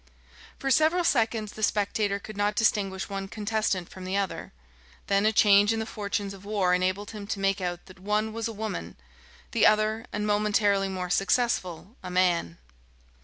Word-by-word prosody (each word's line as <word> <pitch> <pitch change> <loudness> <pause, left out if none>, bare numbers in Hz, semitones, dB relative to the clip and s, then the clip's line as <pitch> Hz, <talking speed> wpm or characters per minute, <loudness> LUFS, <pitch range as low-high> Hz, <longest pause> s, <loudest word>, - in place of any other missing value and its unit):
For 270 - -2
several 320 +6 +3
seconds 225 -7 +1
the 215 - -9
spectator 205 -1 +1
could 215 +1 -10
not 205 +1 0
distinguish 200 -4 +1
one 195 -1 -5
contestant 210 -3 -1
from 185 - -11
the 185 +2 -2
other. 200 -2 -3 0.5
Then 200 +1 +2
a - - +4
change 205 -1 +5
in 225 - 0
the 220 - -2
fortunes 205 -2 -3
of 195 -1 -13
war 200 -3 +1
enabled 185 +3 0
him 210 -2 -8
to 205 - -3
make 195 0 +1
out 175 -1 -4
that 185 -1 -15
one 210 +3 -1
was 230 0 -3
a - - -4
woman, 220 -1 -5 0.6
the 230 - +4
other, 215 +2 +1
and 210 0 -2
momentarily 205 -1 +2
more 180 -2 -4
successful, 195 -1 0
a 185 - -7
man. 180 - +1
205 Hz, 175 wpm, -27 LUFS, 195-215 Hz, 0.6 s, change